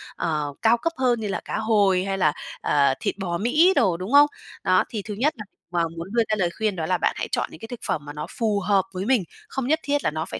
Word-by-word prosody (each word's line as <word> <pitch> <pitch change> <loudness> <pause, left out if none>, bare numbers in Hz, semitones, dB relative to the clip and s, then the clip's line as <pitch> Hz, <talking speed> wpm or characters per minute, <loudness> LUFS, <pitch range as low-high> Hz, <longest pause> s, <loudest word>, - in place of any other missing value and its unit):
ờ, 150 -3 -2
cao 230 +1 +4
cấp 330 +8 -2
hơn 250 -3 +2
như 215 - -3
là 195 - -3
cá - - -3
hồi 205 -4 +3
hay 195 0 -2
là, 155 -6 +3 0.3
ờ, 140 -2 +3
thịt - - -2
bò 175 -3 -2
Mỹ 300 - +4
đồ, 180 -3 +3
đúng 185 +5 -6
không? 290 +1 +8 0.4
Đó, 185 -1 +4
thì 215 - -4
thứ 210 +1 -6
nhất 270 +10 +1
là 210 - -7 0.3
mà 175 -1 +1
muốn 165 +2 -5
đưa 235 -1 +3
ra 215 - +2
lời 185 -4 +1
khuyên, 215 -3 0
đó 165 -3 -2
là 180 +2 +1
bạn - - +1
hãy - - -2
chọn - - -1
những - - -12
cái 225 - -8
thực 245 0 -7
phẩm 150 - -2
mà 145 - -7
nó 150 0 -5
phù 215 -3 +1
hợp 200 -1 +2
với 185 +1 -3
mình, 245 -4 +3 0.3
không 270 -2 -3
nhất 315 +3 +2
thiết 285 0 0
là - - +1
nó 160 +1 -3
phải - - -6
200 Hz, 285 wpm, -24 LUFS, 175-235 Hz, 0.4 s, không